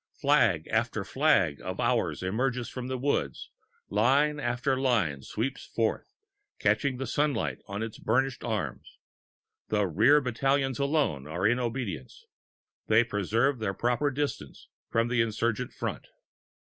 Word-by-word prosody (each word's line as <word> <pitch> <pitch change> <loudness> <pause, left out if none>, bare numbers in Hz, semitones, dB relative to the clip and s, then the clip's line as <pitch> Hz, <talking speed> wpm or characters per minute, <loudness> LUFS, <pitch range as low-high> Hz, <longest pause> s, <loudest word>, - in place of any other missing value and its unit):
Flag 115 - +3
after 110 -2 0
flag 95 - +2
of - - -5
ours - - 0
emerges 120 +5 -1
from 125 -1 -6
the 130 0 -2
wood, 140 +3 0 0.5
line 150 +2 +2
after 125 +1 0
line 115 - +1
sweeps 120 - -3
forth, - - -2 0.4
catching 140 -3 +1
the 135 - -3
sunlight 145 -5 0
on 100 +2 -4
its 110 -1 -6
burnished 130 +3 0
arms. 105 - -4 0.7
The 105 -1 +1
rear 110 - +5
battalions 135 +1 0
alone 140 - 0
are 85 +5 -2
in 120 +4 +3
obedience; 115 - -4 0.6
they 110 +2 +5
preserve 115 +5 0
their 100 -3 -2
proper 125 +5 +1
distance 140 - -4 0.2
from 115 +1 +1
the 120 -1 +2
insurgent 115 +2 -1
front. - - -5
120 Hz, 130 wpm, -28 LUFS, 105-135 Hz, 0.7 s, rear